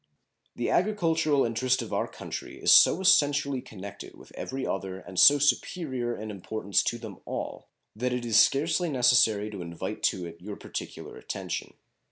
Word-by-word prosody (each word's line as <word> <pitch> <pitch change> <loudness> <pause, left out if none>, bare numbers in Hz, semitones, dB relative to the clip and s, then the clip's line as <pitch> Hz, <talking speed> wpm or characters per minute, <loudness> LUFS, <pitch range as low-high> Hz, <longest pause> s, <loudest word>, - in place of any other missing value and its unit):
The 120 - -2
agricultural 165 -7 +1
interest 120 +3 0
of - - -8
our - - 0
country - - -8
is - - +3
so 180 - +6
essentially 145 -7 +3
connected 100 -3 -10
with - - -16
every 135 0 -5
other 95 -1 -4
and 95 -1 -6
so 145 - +8
superior 135 -4 -1
in 110 0 -6
importance 100 +1 -1
to 120 - -1
them 110 -5 -10
all - - -6 0.3
that 125 +3 -2
it 125 -1 -3
is 110 -2 +4
scarcely 160 +7 +2
necessary 120 -5 +3
to 100 -3 -7
invite 85 -1 -6
to 90 -2 0
it 85 0 -11
your 100 +2 -7
particular - - -8
attention. - - -6
120 Hz, 165 wpm, -27 LUFS, 105-145 Hz, 0.3 s, so